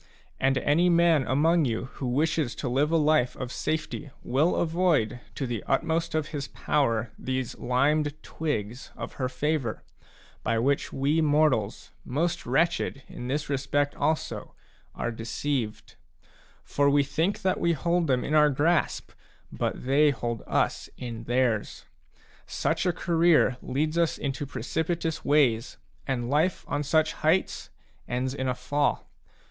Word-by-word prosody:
And 135 0 +2
any 165 +7 +3
man 170 -4 +4
among 160 +4 +3
you 115 -1 -1
who 130 - -4
wishes 150 0 0
to 135 - -4
live 135 +5 +2
a 165 - +4
life 150 -5 +2
of 125 -1 -5
safety 155 0 -3
will 150 +7 +2
avoid, 160 -9 +1 0.2
to 135 - -2
the 120 -4 -3
utmost 165 0 0
of 155 -1 -1
his 140 -3 -4
power, 115 -6 0
these 130 -1 -3
limed 145 +4 +2
twigs 125 -6 -4
of - - -6
her 130 - 0
favour, 130 -2 -2 0.6
by 115 +1 0
which 135 +5 +1
we 145 +4 +1
mortals^ 145 -8 +1
most 155 +4 -2
wretched 140 0 +1
in 125 - -7
this 145 +3 -2
respect 140 +1 0
also, 155 0 -2 0.4
are 120 - -2
deceived; 115 0 -3 0.7
for 140 0 +2
we 145 0 +4
think 165 +8 -1
that 185 -1 +1
we 170 - +2
hold 170 +2 0
them 130 -3 +1
in 150 - -3
our 150 -1 +6
grasp, 155 +5 +1 0.4
but - - -3
they 145 +3 +4
hold 120 -4 -3
us - - 0
in 115 -2 -6
theirs. 120 -3 0 0.6
Such - - -1
a - - +4
career 165 -6 +3
leads 155 +5 -1
us 170 -2 +1
into 140 0 -3
precipitous 160 +2 -2
ways, 130 -5 +2 0.3
and 125 -3 -1
life 155 +7 +1
on 145 - -1
such 155 +2 +2
heights 165 +5 0 0.4
ends 125 +1 -1
in 130 -1 -3
a 125 - 0
fall. 145 +4 -1
145 Hz, 145 wpm, -27 LUFS, 125-160 Hz, 0.7 s, our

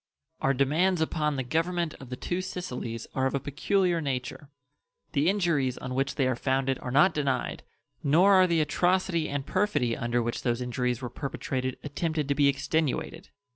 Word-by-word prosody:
Our 135 0 +2
demands 160 +7 +2
upon 155 -2 0
the 130 - -1
Government 165 +5 -1
of 135 - -11
the 125 - -4
two 175 +7 -3
Sicilies 125 -11 -5
are 130 0 +1
of 135 - -2
a - - +1
peculiar 175 +5 +1
nature. 135 +1 -4 0.6
The 150 +2 +2
injuries 165 -10 +1
on 130 0 -5
which 135 +1 -1
they 135 - +1
are 130 - +1
founded 135 +1 0
are 125 - -6
not 150 +8 +5
denied, 140 -4 -1 0.4
nor 175 +8 +5
are 185 -1 +6
the 170 -2 +2
atrocity 175 +1 +1
and 140 -1 -3
perfidy 185 - +1
under 120 -1 0
which 120 +1 -3
those 120 -1 0
injuries 125 0 -2
were 125 - -3
perpetrated 130 -2 -3
attempted 150 0 -2
to - - +4
be 140 0 +3
extenuated. 160 +5 -1
140 Hz, 175 wpm, -28 LUFS, 130-170 Hz, 0.6 s, are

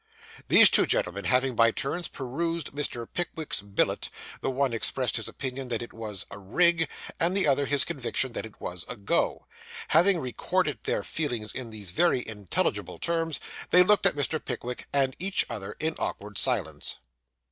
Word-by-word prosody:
These - - +9
two - - +4
gentlemen 90 +2 0
having 125 +5 +2
by 115 0 +5
turns 150 +9 -3
perused 165 +5 -3
Mr. 140 -5 -3
Pickwick's 160 - -1
billet, 100 -1 0 0.3
the - - -1
one 135 -1 0
expressed 120 +3 -1
his 115 - -3
opinion 130 -1 -5
that 120 -1 -2
it 120 - -10
was 110 -4 -4
'a 100 - -8
rig,' 165 - +3 0.3
and 175 +4 +2
the 195 - +4
other 140 0 +2
his 140 0 +3
conviction 130 -1 -2
that - - -3
it 110 -1 -11
was 90 0 -5
'a - - -5
go.' 100 -3 0 0.4
Having 175 +4 +5
recorded 130 -5 -1
their - - 0
feelings 120 -9 -2
in 125 -3 -5
these 105 -5 -5
very 130 - +2
intelligible 105 -4 -1
terms, 165 -3 -1 0.3
they 180 - +7
looked 205 +1 +4
at - - +1
Mr. 145 +2 -1
Pickwick 125 -1 -5
and 135 -2 +2
each 190 +2 +2
other 105 -4 -6
in 160 +1 0
awkward 105 +1 -4
silence. 90 - 0
130 Hz, 170 wpm, -27 LUFS, 110-160 Hz, 0.4 s, These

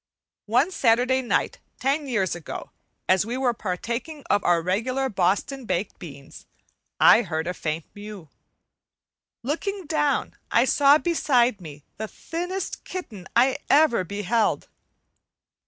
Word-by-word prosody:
One 250 - +2
Saturday 250 -2 +2
night 245 - -1 0.2
ten 280 +2 0
years 205 -8 0
ago, 170 -4 -7 0.4
as 185 0 +4
we 235 +4 -4
were 255 -2 +1
partaking 235 - -4
of 205 - +2
our 175 -1 +3
regular 250 +9 0
Boston 205 +7 0
baked 185 0 -2
beans, 140 -5 -11 0.5
I - - +7
heard 160 -6 -3
a 180 - -2
faint 155 -2 -3
mew. 205 -5 -9 1.2
Looking 370 - -3
down 295 -2 0
I 235 - +4
saw 285 +2 +5
beside 255 - +2
me 150 -4 -10
the 220 - -4
thinnest 355 - -5
kitten 220 - -7
I 255 +3 +4
ever 285 -9 +4
beheld. 205 +4 0
235 Hz, 125 wpm, -24 LUFS, 185-275 Hz, 1.2 s, I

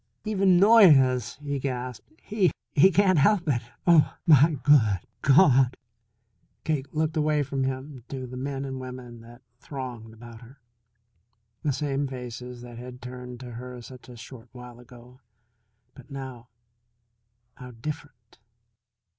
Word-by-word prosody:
"Even 195 -4 +3
Noyes," 150 - +5
he 140 -1 -3
gasped. 125 - -5
"He 205 -4 +1 0.2
he 165 +6 +6
can't 185 -2 +3
help 185 +3 +3
it. 125 -5 +1 0.2
Oh, 165 -4 +4
my 150 -1 +5
goo 145 - +3
hood 105 -7 0 0.2
Gaw 140 +5 +6
hud!" 130 -1 +2 0.9
Cake 145 -3 -2
looked 155 0 -1
away 150 -1 +1
from 135 -1 -2
him 130 0 -5
to 130 -2 -5
the 125 0 -9
men 135 +1 -4
and 130 -1 -5
women 125 -2 -9
that 120 +2 -16 0.2
thronged 125 -7 -8
about 115 0 -13
her. 125 +3 -16 1.0
The 150 - 0
same 140 0 -2
faces 125 -1 -8
that 120 -1 -10
had 125 0 -10
turned 125 0 -9
to 125 -1 -9
her 125 +1 -8
such 125 +1 -13
a 120 - -11
short 115 0 -12
while 125 -1 -12
ago; 125 +1 -16 0.7
but 135 -1 -16
now, 130 -3 -8 1.1
how 125 -1 -10
different! 120 -1 -9
130 Hz, 145 wpm, -26 LUFS, 125-145 Hz, 1.1 s, he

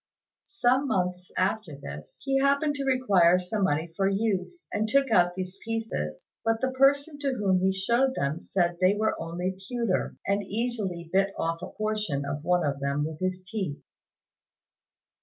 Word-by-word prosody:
Some 265 -7 +2
months 180 -5 -1
after 185 -5 0
this, 75 - -9
he 270 -1 +2
happened 280 +2 +3
to 280 -1 -3
require 200 -10 +4
some 185 +3 -1
money 160 0 -1
for 195 +1 +2
use, 205 - -1
and 215 +1 0
took 275 +1 +3
out 175 -3 +4
these 185 +1 -5
pieces; 225 - -3 0.2
but 225 0 +1
the 260 +1 0
person 280 +3 +3
to 275 -2 0
whom 195 -6 +2
he 190 +1 +3
showed 235 +8 +1
them 140 +4 -1
said 175 -2 0
they 185 +2 +5
were 220 +1 +1
only 175 +3 -3
pewter, 235 -6 -1
and 200 +1 +1
easily 200 -6 -3
bit 195 +1 +2
off 165 +1 -1
a - - -5
portion 210 -10 -2
of 145 +1 -4
one 180 0 +2
of 140 -1 -1
them 140 +1 0
with 155 0 -6
his 185 0 -2
teeth. 190 -8 -4
195 Hz, 170 wpm, -27 LUFS, 175-235 Hz, 0.2 s, they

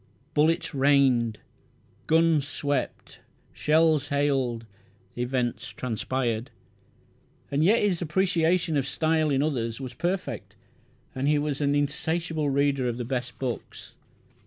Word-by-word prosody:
Bullets 160 +2 +2
"rained"; 135 -5 +3 0.7
guns 160 -3 +3
"swept"; 145 0 -3 0.3
shells 155 -1 +3
"hailed"; 135 -5 0 0.5
events 125 -2 -2
"transpired", 120 0 -2 1.0
and 140 +2 +2
yet 210 +7 +4
his 185 -5 +1
appreciation 170 -1 +1
of 135 -1 0
style 155 +1 +1
in 140 0 +2
others 115 -6 -2
was 130 -2 -6
perfect, 175 +7 -3 0.6
and 130 +2 -2
he 150 0 +3
was 145 -1 -2
an 145 0 +2
insatiable 155 +2 -1
reader 140 -2 +1
of 120 - -4
the 120 - -4
best 125 -1 -3
books. 125 -3 -6
145 Hz, 115 wpm, -26 LUFS, 130-160 Hz, 1.0 s, yet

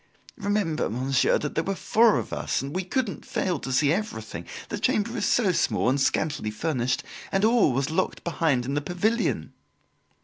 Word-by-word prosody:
Remember, 200 -6 0
monsieur, 130 +4 +2
that 150 - -4
there 160 - 0
were 195 +2 -2
four 225 +3 +4
of - - -4
us - - -1
and 140 +4 -6
we 185 - 0
couldn't 225 +2 -2
fail 180 -5 -1
to 135 - -5
see 145 +3 +3
everything 110 - -4 0.2
the - - -3
chamber 225 +3 +1
is - - 0
so 215 -7 +3
small 110 - +1
and 135 +2 +1
scantily 145 -6 0
furnished, 125 +2 -1 0.3
and 195 +2 +2
all 225 - +4
was 135 +4 -1
locked 185 +4 -1
behind 155 -7 +1
in 135 - -2
the 145 - 0
pavilion." 180 +9 -1
160 Hz, 180 wpm, -26 LUFS, 135-200 Hz, 0.3 s, four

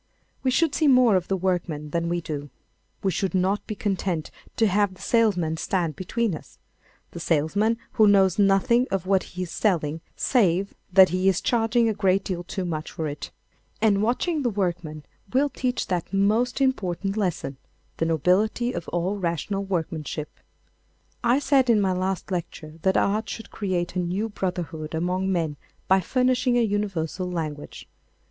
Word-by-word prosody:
We 260 - +1
should 285 +3 +2
see 310 +1 +2
more 250 -5 +6
of 180 -1 0
the 195 - 0
workman 170 -5 -2
than 170 +1 -1
we 175 0 -1
do. 145 -3 -5 0.5
We 195 - +2
should 190 +1 -1
not 190 +3 0
be 215 - -4
content 190 -6 -2 0.2
to 225 - +3
have 200 -1 +2
the - - -16
salesman 180 -9 +2
stand 170 -3 -1
between 220 +3 -1
us—the 160 +2 -13
salesman 175 +9 +1
who 215 - +4
knows 195 -2 +4
nothing 205 +5 +4
of 190 -2 -2
what 190 0 +3 0.2
he 185 - -1
is 175 - -7
selling 165 -6 0
save 195 -6 +2 0.2
that 190 0 +7
he 185 +2 +2
is 190 - +1
charging 230 0 +2
a 220 - +1
great 195 -2 +2
deal 175 -2 -3
too 185 +1 -4
much 155 -2 -4
for 160 - -3
it. 145 0 -6 0.5
And 205 -3 +3
watching 290 +8 0
the 245 - +1
workman 175 -7 -3 0.3
will 280 +3 +3
teach 250 -2 -2
that 180 -3 -2
most 215 +7 +1
important 195 -7 0
lesson—the 165 -6 -4
nobility 185 - +1
of 170 - -5
all 175 +4 -1
rational 185 +3 -2
workmanship. 160 -5 -3 0.9
I 240 +2 +4
said 275 -3 +3
in 225 -2 +5
my 195 -2 +2
last 185 +1 -2
lecture 160 -3 -5
that 190 +2 +2
art 215 +2 +1
would 225 - -12
create 185 -4 -2
a - - 0
new 185 +5 -1
brotherhood 170 -6 -4
among 180 +3 0
men 160 -5 -1 0.3
by 190 +1 +5
furnishing 255 +3 +2
a - - +4
universal 195 -5 -1
language. 155 -4 -5
190 Hz, 165 wpm, -25 LUFS, 170-215 Hz, 0.9 s, that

